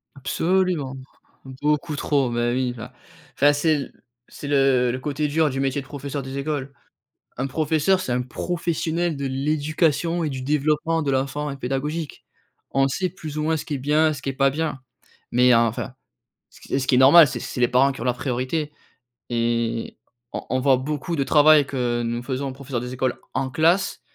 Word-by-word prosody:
Absolument. 165 0 0 0.5
Beaucoup 150 +4 -1
trop. 140 -3 +1
Bah, 120 0 0
oui, 125 0 0
bah, 120 +2 -9 0.4
enfin, 145 +1 +5
c'est 155 +2 +2
l 140 -2 -5 0.4
c'est 145 - -8
le 135 -3 +3
le 130 - -4
côté 150 +2 -2
dur 155 +1 +2
du 135 - -4
métier 135 +1 0
de 135 - -15
professeur 140 0 -5
des 135 +1 -6
écoles. 140 -1 -3 0.7
Un 130 - -1
professeur, 155 +6 +1
c'est 130 -9 -3
un 125 - +1
professionnel 170 +3 -2
de 140 0 -3
l'éducation 155 +4 0
et - - 0
du 130 -2 -5
développement 150 +3 +1
de 140 - -1
l'enfant 140 +2 -1
et 140 - -6
pédagogique. 140 +4 -4 0.5
On 135 0 +3
sait, 185 +7 -1
plus 155 -4 -7
ou - - 0
moins, 160 +1 +1
ce 150 - -5
qui 150 - -4
est - - -2
bien, 150 +3 +2
ce 140 - -7
qui 140 - -6
est - - 0
pas 135 0 +3
bien. 150 -1 -3 0.5
Mais 125 0 +5
enfin, 115 +2 0 0.6
ce - - -19
qui - - -6
est - - +3
ce 130 - -2
qui 125 - +3
est - - +5
normal, 145 +5 +8
c'est - - -5
c'est 125 - -5
les 120 - +4
parents 135 +3 +3
qui 135 - -10
ont - - -4
la 125 - +2
priorité 130 +4 -2 0.6
et 115 -1 -1 0.4
on - - -4
on 130 - +1
voit 135 0 +4
beaucoup 150 +5 -3
de 140 - +1
travail 150 0 +6
que 120 -3 -1
nous 120 +1 -2
faisons, 135 +1 -3
professeurs 130 -2 -5
des 125 +1 -6
écoles, 130 0 -1 0.2
en 135 -1 -1
classe 170 +7 +1
140 Hz, 200 wpm, -23 LUFS, 130-155 Hz, 0.7 s, normal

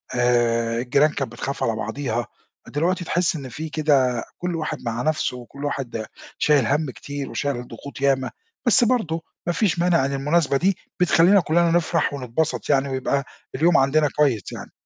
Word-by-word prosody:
آآ 115 -1 +2
الجيران 140 +5 +3
كانت 135 -5 -3
بتخاف 135 +3 -4
على 115 - +1
بعضيها، 120 +1 -3 0.4
دلوقتي 175 +4 -1
تحس 175 0 +1
إن 135 -4 -6
في 155 +6 -6
كده 140 -6 +2
كل 180 -1 -3
واحد 155 -2 -3
مع 115 +1 -2
نَفْسه 155 -3 0
وكل 140 +4 -9
واحد 120 -6 -3 0.3
شايل 145 -5 +3
هَم 145 -1 0
كتير 145 +1 -6
وشايل 140 -2 -2
الضغوط 125 +3 -9
ياما، 135 -2 +1 0.3
بس 240 0 +5
برضه 220 -10 +1 0.3
ما 175 - +1
فيش 185 -5 +1
مانع 170 -5 +3
إن 140 - -2
المناسبة 145 +1 +1
دي 190 +5 +1 0.2
بتخلّينا 180 +2 +5
كُلّنا 170 +1 +2
نفرح 165 -2 +1
ونتبسط 140 +4 -2
يعني 140 -1 +2
ويبقى 135 +1 -1 0.3
اليوم 165 +5 +4
عندنا 145 +2 +3
كويس 135 -10 +1
يعني. - - -8
140 Hz, 165 wpm, -23 LUFS, 125-165 Hz, 0.4 s, بس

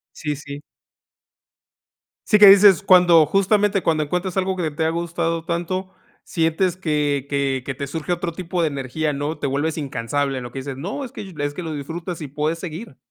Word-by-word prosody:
Sí, 150 -2 -3
sí. 145 0 -9 1.7
Sí 210 - +4
que 205 - +10
dices 195 -1 +8
cuando, 175 -5 +6
justamente, 200 +2 +2
cuando 160 -2 +1
encuentras 180 +5 -2
algo 190 0 0
que 160 -4 -1
te 160 +2 -3
ha - - +2
gustado 165 0 -2
tanto, 185 +2 -3 0.3
sientes 165 +2 0
que 150 -6 -1
que 135 -2 0
que 135 +1 -5
te 140 - -4
surge 160 +4 -3
otro 175 0 -3
tipo 175 0 -3
de - - +2
energía, 145 +2 -2
¿no? 145 +3 -3
Te - - -4
vuelves 145 +4 -1
incansable, 135 -1 -2
lo 120 -1 -8
que 135 - -9
dices, 135 0 -6
no, 195 - -5
es 245 - -10
que 195 -2 -8
es 145 0 -2
que 180 - -6
lo 160 -2 -5
disfrutas 165 +4 -6
y 150 - -5
puedes 150 +4 -2
seguir. 165 - -8
160 Hz, 190 wpm, -21 LUFS, 145-180 Hz, 1.7 s, que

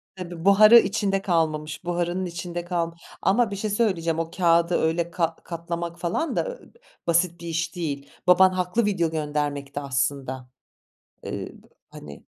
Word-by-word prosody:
Tabii 175 -1 -8
buharı 215 +4 +8
içinde 195 -1 0
kalmamış, 160 -4 -1
buharının 175 +1 -1
içinde 175 0 -5
kalm 170 -2 -2 0.3
ama 225 +1 +2
bir - - -3
şey 210 +2 -3
söyleyeceğim, 185 -7 0
o 165 0 -3
kâğıdı 170 -1 +3
öyle 165 +1 0
kat 165 -2 -2
katlamak 170 0 -5
falan 175 - -1
da, - - -2
eee, - - -18 0.4
basit 170 0 +2
bir 170 - -7
iş 165 +1 -2
değil. 145 -5 -4 0.2
Baban 185 +1 +6
haklı 185 +5 0
video 175 -6 0
göndermekte 145 -2 -2
aslında, 135 -1 -2 0.7
eee, - - -6 0.2
b - - -19 0.2
hani. 70 -1 -11
170 Hz, 150 wpm, -24 LUFS, 160-185 Hz, 0.7 s, buharı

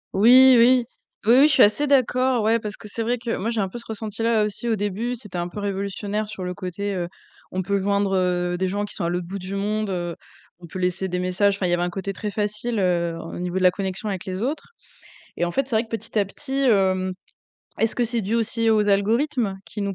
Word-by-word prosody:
Oui, 255 +6 +8
oui. 245 +1 +5 0.4
Oui, 230 - +6
oui, 290 - +7
je 305 - +2
suis - - +7
assez 215 +8 +3
d'accord, 255 -3 +2
ouais, 225 +2 +3
parce 210 -1 -6
que 215 - -11
c'est 220 +2 -5
vrai 240 +2 0
que, 235 -1 -3
moi, 210 +4 -2
j'ai 230 -2 0
un 195 - 0
peu 240 - -7
ce 235 - -12
ressenti 220 0 -5
là, 225 -1 +3
aussi 210 +3 -3
au 225 - +2
début, 205 +4 -2
c'était 210 -6 -7
un 175 - -2
peu 180 - -8
révolutionnaire 200 +1 -3
sur 210 -3 -7
le 180 0 -3
côté, 200 +2 -4
heu, 175 -2 -2 0.4
on 185 - -1
peut 200 +1 0
joindre, 200 0 +1
heu, 180 -1 0
des 190 +1 0
gens 205 +2 -2
qui 205 - -7
sont - - -3
à - - 0
l'autre 175 0 -2
bout 195 +3 -6
du 185 +2 -6
monde, 210 +1 -1
heu, 175 -2 -3 0.4
on 170 - -11
peut 175 - -8
laisser 185 +1 -1
des 180 -1 -2
messages, 185 +2 +1
enfin, 195 - -2
il - - +1
y - - +2
avait 175 - +1
un 175 - 0
côté 195 +2 -4
très 210 +2 -4
facile, 210 +3 -2
heu, 170 -3 +1
en 165 - -8
au - - -6
niveau 180 +1 -3
de 190 - 0
la 180 - +6
connexion 195 +2 -4
avec 190 -3 -4
les 185 +2 -4
autres 300 - -4 0.6
et - - 0
en 175 - 0
fait, 270 +7 0
c'est 235 - -2
vrai 220 - +3
que - - -24
petit 225 0 -5
à - - +4
petit, 270 +7 -5
hem, 190 -6 +2 0.7
est-ce 225 0 +2
que 245 - +2
c'est 235 0 -1
dû 205 +3 -2
aussi 230 0 0
aux 210 -1 +3
algorithmes 220 +1 +1
qui 210 - -7
nous 200 -1 -2
205 Hz, 265 wpm, -23 LUFS, 185-230 Hz, 0.7 s, Oui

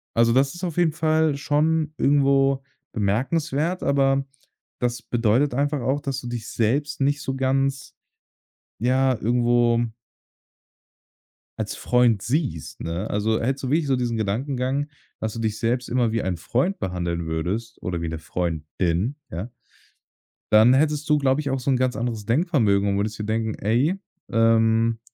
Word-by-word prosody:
Also, 115 0 +4
das 135 +2 +2
ist 175 - -10
auf 170 -4 -2
jeden 175 -2 +3
Fall 155 -1 +1
schon 155 +2 +1
irgendwo 135 -1 +3 0.3
bemerkenswert. 140 - 0
Aber 135 -1 +2 0.5
das 120 -1 -1
bedeutet 120 +4 +1
einfach 145 +2 0
auch, 135 +4 0
dass 135 -3 -3
du 120 - -7
dich 120 -2 -5
selbst 145 +6 0
nicht 145 +1 +1
so 135 - -3
ganz, 135 +1 -1 0.8
ja, 130 +2 +2
irgendwo 120 +1 +2 1.8
als - - -3
Freund 120 -4 +2
siehst, 130 - -2
ne? 85 +5 -3
Also, 110 +2 0
hättest 135 +3 -1
du - - -2
wirklich 150 +1 +1
so 135 - +2
diesen 120 -2 -1
Gedankengang, 130 +6 -1 0.3
dass 110 -1 -3
du - - -6
dich 110 -1 -2
selbst 120 +1 -1
immer 120 -2 +1
wie 115 0 -1
ein 90 -2 -2
Freund 155 - -1
behandeln 85 -2 -2
würdest 95 +9 -3
oder 85 -2 -3
wie 85 - -2
'ne 80 0 -4
Freundin, 85 - -2
ja 95 +9 -5 1.0
dann 110 +4 +7
hättest 150 +2 +1
du, 150 - +5
glaube 140 0 +2
ich, 145 - -2
auch 135 0 -1
so 135 +2 0
'n 130 - +3
ganz 130 -1 0
anderes 115 -3 -3
Denkvermögen 115 - +2
und 100 - 0
würdest 105 +1 -2
dir 105 - -4
denken: 110 0 -1
„Ey, 125 - +1 0.3
ähm“ 115 0 +3
125 Hz, 160 wpm, -23 LUFS, 110-140 Hz, 1.8 s, dann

